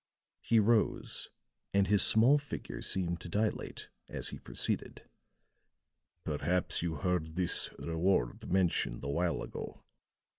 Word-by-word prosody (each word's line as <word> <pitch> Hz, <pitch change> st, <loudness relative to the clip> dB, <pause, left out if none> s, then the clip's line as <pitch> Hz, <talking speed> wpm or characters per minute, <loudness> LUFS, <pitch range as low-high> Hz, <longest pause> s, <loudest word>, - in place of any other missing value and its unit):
He 115 Hz, -, +2 dB
rose, 110 Hz, 0 st, +1 dB, 0.5 s
and 100 Hz, -1 st, +5 dB
his 100 Hz, 0 st, +4 dB
small 120 Hz, +9 st, +6 dB
figure 145 Hz, -, -7 dB
seemed 85 Hz, -2 st, -1 dB
to -, -, -8 dB
dilate 105 Hz, +4 st, -2 dB, 0.2 s
as -, -, -1 dB
he -, -, -8 dB
proceeded: -, -, -4 dB, 1.2 s
"Perhaps 85 Hz, +4 st, 0 dB
you 85 Hz, -1 st, -2 dB
heard 90 Hz, -4 st, -1 dB
this 90 Hz, -1 st, +2 dB
reward 85 Hz, -6 st, 0 dB
mentioned 90 Hz, -9 st, +1 dB
a 70 Hz, -, -3 dB
while 85 Hz, +4 st, 0 dB
ago. -, -, -8 dB
90 Hz, 120 wpm, -32 LUFS, 85-100 Hz, 1.2 s, small